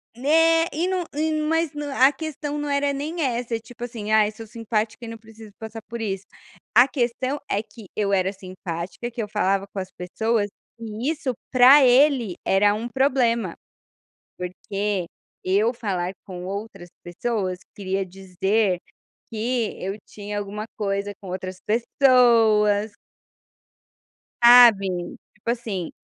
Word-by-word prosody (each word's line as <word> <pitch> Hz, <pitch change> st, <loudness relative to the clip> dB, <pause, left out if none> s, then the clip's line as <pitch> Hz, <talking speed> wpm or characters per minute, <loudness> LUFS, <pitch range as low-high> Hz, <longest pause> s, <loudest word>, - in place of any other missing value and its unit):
Né, 325 Hz, +5 st, +4 dB
e 330 Hz, +4 st, -1 dB
num 370 Hz, -1 st, 0 dB
e 315 Hz, +1 st, 0 dB
num 305 Hz, 0 st, -1 dB
mas 325 Hz, -1 st, +1 dB
no 295 Hz, -1 st, -5 dB
a 270 Hz, 0 st, +5 dB
questão 295 Hz, -1 st, -5 dB
não 295 Hz, 0 st, -3 dB
era 280 Hz, 0 st, +1 dB
nem 300 Hz, +5 st, -4 dB
essa, 240 Hz, -3 st, -1 dB
tipo 240 Hz, +2 st, -11 dB
assim, 225 Hz, -3 st, -5 dB
"ai 215 Hz, -1 st, +4 dB
sou 225 Hz, +1 st, -10 dB
simpática 225 Hz, 0 st, -3 dB
e -, -, -6 dB
não 230 Hz, 0 st, -7 dB
preciso 220 Hz, -1 st, -14 dB
passar 220 Hz, 0 st, -8 dB
por 235 Hz, +2 st, -8 dB
isso", 195 Hz, -3 st, -4 dB, 0.5 s
a 245 Hz, +3 st, +8 dB
questão 255 Hz, +1 st, -1 dB
é 205 Hz, -, 0 dB
que 220 Hz, -2 st, -14 dB
eu 200 Hz, -2 st, 0 dB
era 190 Hz, 0 st, +2 dB
simpática, 185 Hz, +2 st, -6 dB
que 235 Hz, -1 st, -4 dB
eu -, -, -5 dB
falava 195 Hz, -2 st, 0 dB
com 200 Hz, -, -3 dB
as 185 Hz, 0 st, -6 dB
pessoas 205 Hz, +3 st, -1 dB, 0.3 s
e 225 Hz, +4 st, -4 dB
isso 285 Hz, -5 st, -3 dB, 0.2 s
pra 265 Hz, +3 st, +8 dB
ele 255 Hz, -, +4 dB
era 205 Hz, +2 st, +3 dB
um 225 Hz, +3 st, -4 dB
problema, 240 Hz, -6 st, +1 dB, 0.8 s
porque 195 Hz, +1 st, -3 dB, 0.4 s
eu 205 Hz, +6 st, +2 dB
falar 190 Hz, -6 st, -2 dB
com 180 Hz, -2 st, -8 dB
outras 195 Hz, -2 st, -6 dB
pessoas 185 Hz, 0 st, -3 dB, 0.2 s
queria 195 Hz, -1 st, -2 dB
dizer 190 Hz, +1 st, -1 dB, 0.5 s
que 230 Hz, 0 st, -1 dB
eu 195 Hz, +2 st, -3 dB
tinha 205 Hz, 0 st, -6 dB
alguma 205 Hz, +1 st, -5 dB
coisa 200 Hz, -1 st, -2 dB
com 195 Hz, -, -9 dB
outras 185 Hz, 0 st, -5 dB
pessoas. 225 Hz, -3 st, +4 dB, 1.5 s
Sabe, 205 Hz, -7 st, +6 dB, 0.2 s
tipo 215 Hz, +1 st, -7 dB
assim 215 Hz, -8 st, -4 dB
220 Hz, 145 wpm, -23 LUFS, 195-250 Hz, 1.5 s, a